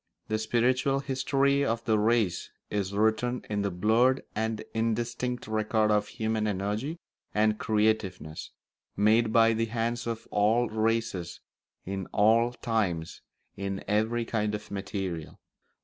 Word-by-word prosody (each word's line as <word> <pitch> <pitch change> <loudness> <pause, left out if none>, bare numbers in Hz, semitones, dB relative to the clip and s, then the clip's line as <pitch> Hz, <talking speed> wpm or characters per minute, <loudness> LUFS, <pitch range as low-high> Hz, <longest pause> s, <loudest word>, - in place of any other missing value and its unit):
The 110 0 0
spiritual 125 +4 +1
history 140 +1 +1
of 115 -3 -1
the 110 -2 +3
race 110 -5 +1 0.2
is 100 -2 -1
written 110 +4 +1
in 105 -1 0
the 100 - 0
blurred 110 +8 +2
and 110 0 -2
indistinct 120 +2 -1
record 110 0 +1
of 105 0 +2
human 110 -1 -1
energy 105 - -2 0.4
and 105 0 +2
creativeness, 105 -7 0 0.5
made 110 +2 +4
by 115 0 +5
the 115 +1 0
hands 115 +1 -2
of 115 -1 -4
all 110 +4 +3
races, 110 -5 -1 0.5
in 95 -1 -4
all 115 +3 +3
times, 105 -9 -2 0.3
in 100 0 -4
every 110 +3 +1
kind 105 -2 -1
of 105 -1 -8
material. 95 -5 -4
110 Hz, 130 wpm, -28 LUFS, 105-115 Hz, 0.5 s, by